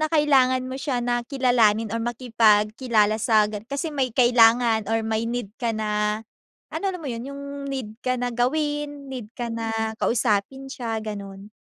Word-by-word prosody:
na 310 - +1
kailangan 270 -4 +4
mo 260 - -5
siya 265 -3 -2
na 240 0 -1
kilalanin 235 -5 +2
or 230 - -1
makipagkilala 220 -2 +2
sa 215 -1 +3
gan 210 0 -6
kasi 280 +6 -3
may 270 -6 -1
kailangan 235 -2 +4
or 225 - +2
may 220 0 -1
need 235 -3 -3
ka 235 -2 -1
na, 210 0 -1 0.5
ano, - - -5
alam 360 - -7
mo, 300 - -5
yun, 235 -1 -4
yung 280 +1 -7 0.2
need 260 -6 -5
ka 255 -1 0
na 245 - 0
gawin, 290 +3 -1
need 245 -5 -7
ka 240 -2 -4
na 225 -1 -3
kausapin 235 +4 0
siya, 230 -4 -4
gano'n. 200 -2 -7
235 Hz, 170 wpm, -24 LUFS, 220-260 Hz, 0.5 s, kailangan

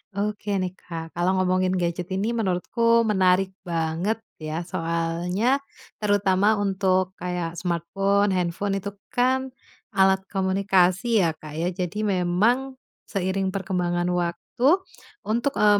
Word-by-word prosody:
Oke 205 -1 -1
nih, 185 0 -3
Kak, 165 -3 -8
kalau 175 +2 +2
ngomongin 185 0 +2
gadget 175 0 -2
ini 210 +5 0
menurutku 230 +3 +2
menarik 190 -2 +2
banget 170 +5 -1 0.2
ya. 155 +1 -3
Soalnya 175 +11 0 0.4
terutama 205 +1 +3
untuk 190 -2 +1
kayak 175 -2 -3
smartphone, 195 +4 +1
handphone 180 +3 -1
itu 200 +1 -3 0.2
kan 260 +1 0 0.4
alat 190 0 +5
komunikasi 190 +2 +2
ya, 165 - +2
Kak, 155 -1 -10
ya. 170 +3 -1
Jadi 185 +3 -3
memang 210 +8 +1 0.3
seiring 190 0 -1
perkembangan 180 -2 -1
waktu 180 - +1 0.4
untuk, 240 +6 0
eee, 205 0 +5
190 Hz, 120 wpm, -24 LUFS, 175-205 Hz, 0.4 s, alat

